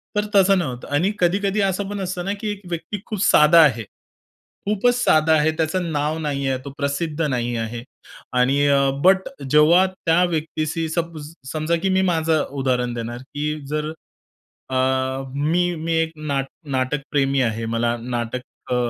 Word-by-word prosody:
तर 210 0 +1
तसं 195 0 +5
नव्हतं. 125 -7 -4
आणि 180 +8 +2
कधी-कधी 195 +3 +1
असं 195 +1 -1
पण 205 -1 -4
असतं 180 -1 -4
ना, 200 - -1
की 215 - -2
एक 205 -1 -7
व्यक्ती 175 +4 -4
खूप 215 -4 -5
साधा 150 +3 +6
आहे. 120 -7 +3 0.8
खूपच 215 +4 +2
साधा 155 +1 +4
आहे, 155 +1 +3
त्याचं 165 +1 -1
नाव 150 +1 -1
नाहीये, 140 -3 -1
तो - - -5
प्रसिद्ध 150 +3 -2
नाही 120 -5 -1
आहे 115 +1 -4 0.5
आणि 135 +3 +3
अ, 140 -1 +3
बट 190 +1 +7 0.3
जेव्हा 160 +6 +6
त्या 180 -2 +1
व्यक्तीशी 160 0 -2
सपो 165 -1 -3 0.3
समजा 155 +2 0
की 195 - +2
मी 190 0 +3
माझं 160 -2 +1 0.2
उदाहरण 125 -2 0
देणार, 120 0 -5
की 150 +3 -4
जर, 150 +1 -2 0.8
अ, 130 - -3 0.6
मी 175 +5 +1
मी 165 +1 -3
एक 160 0 -2
ना 145 -3 -1 0.4
नाटक 130 +3 -1
प्रेमी 135 -2 +2
आहे. 115 -1 -1
मला 115 +1 0
नाटक 120 0 -3 0.3
अ, - - +2
155 Hz, 160 wpm, -22 LUFS, 135-175 Hz, 0.8 s, बट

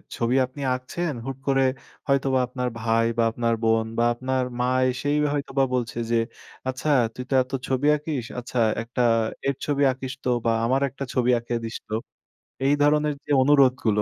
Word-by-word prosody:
ছবি 120 +2 0
আপনি 130 +3 -10
আঁকছেন 150 +6 -3
হুট 135 -1 -4
করে 135 -1 +3 0.4
হয়তোবা 135 -1 +2
আপনার 125 0 -3
ভাই 115 0 +2
বা 115 - +3
আপনার 115 0 0
বোন 110 0 +3
বা 115 - +3
আপনার 130 +2 -1 0.2
মা 125 - +1 0.2
এসেই 145 +4 -1 0.2
হয়তোবা 140 -1 0
বলছে, 120 -2 -2
যে, - - +3 0.5
আচ্ছা 130 +4 -3 0.3
"তুই 125 - -5
তো - - -2
এত 130 - -19 0.2
ছবি 135 +2 +1
আঁকিস। 145 -5 -4
আচ্ছা 125 0 -4 0.2
একটা 120 +2 -3 0.5
এর 140 - +1
ছবি 145 -1 +1
আঁকিস 130 0 -6
তো - - 0 0.2
বা 115 - +3
আমার 130 +3 +2
একটা 135 +2 -7
ছবি 125 0 +2
এঁকে 120 0 -3
দিস 115 - -4
তো।" 110 - -1 0.7
এই 140 - +4
ধরনের 150 +1 +3
যে, - - -5
অনুরোধগুলো 130 -6 +4
130 Hz, 175 wpm, -24 LUFS, 120-140 Hz, 0.7 s, এই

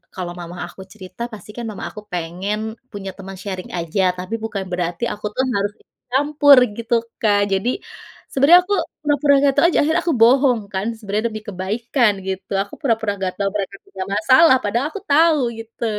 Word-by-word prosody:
kalau 180 -3 -4
mama 175 +1 -8
aku 185 - -12
cerita 190 +1 -12
pasti 215 - -11
kan 240 - -4
mama 210 - -7
aku 210 - -9
pengen 180 +4 -3 0.3
punya 195 -2 -6
teman 195 -1 -8
sharing 185 -2 -5
aja, 170 +3 -1 0.2
tapi 185 +5 -4
bukan 205 -3 -3
berarti 175 +1 -2
aku 210 0 -9
tuh 260 - +1
harus 200 +1 0
ikut - - -36
campur 285 +1 +5 0.2
gitu 230 0 -3 0.3
Kak 205 -2 +3
jadi, 195 +5 +1 0.6
sebenernya 285 +6 +7
aku 405 +3 0 0.3
pura-pura 290 -1 +3
gak 275 - +4
tahu - - +5
aja, - - 0
akhirnya 320 +4 +2
aku 335 - +3
bohong 250 +1 +5
kan 190 +1 -1
sebenarnya 210 0 -2
demi 215 -1 -6
kebaikan 215 +5 +1 0.2
gitu, 190 0 -5
aku 200 - -19
pura-pura 225 -6 +1
enggak 185 -1 -2
tahu 200 -1 0
mereka 200 -1 -3
punya 190 -1 -6
masalah, 260 +8 +6
padahal 235 +7 0
aku 405 - -7
tahu 320 +1 +5 0.2
gitu. 225 +1 -6
215 Hz, 185 wpm, -20 LUFS, 190-265 Hz, 0.6 s, sebenernya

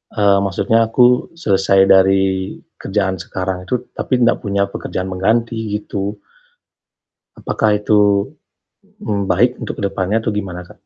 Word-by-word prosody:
Eee, 100 -2 +3
maksudnya 110 +3 +1
aku 125 +5 +2
selesai 95 - +2
dari 95 0 +3 0.2
kerjaan 95 -2 -2
sekarang 95 -1 -5
itu 125 +1 -3
tapi 125 -2 -1
nggak 120 - +2
punya 100 -2 -1
pekerjaan 95 0 -5
pengganti 110 +5 0 0.2
gitu. 100 -1 -4 1.2
Apakah 105 -1 0
itu, 105 -1 +2 0.7
mmm, 100 -3 -3
baik 125 +1 +3
untuk - - -6
jkedepannya 100 +1 -1
atau 110 - -2
gimana, 95 -3 -4
Kak? - - -14
100 Hz, 125 wpm, -17 LUFS, 95-110 Hz, 1.2 s, Eee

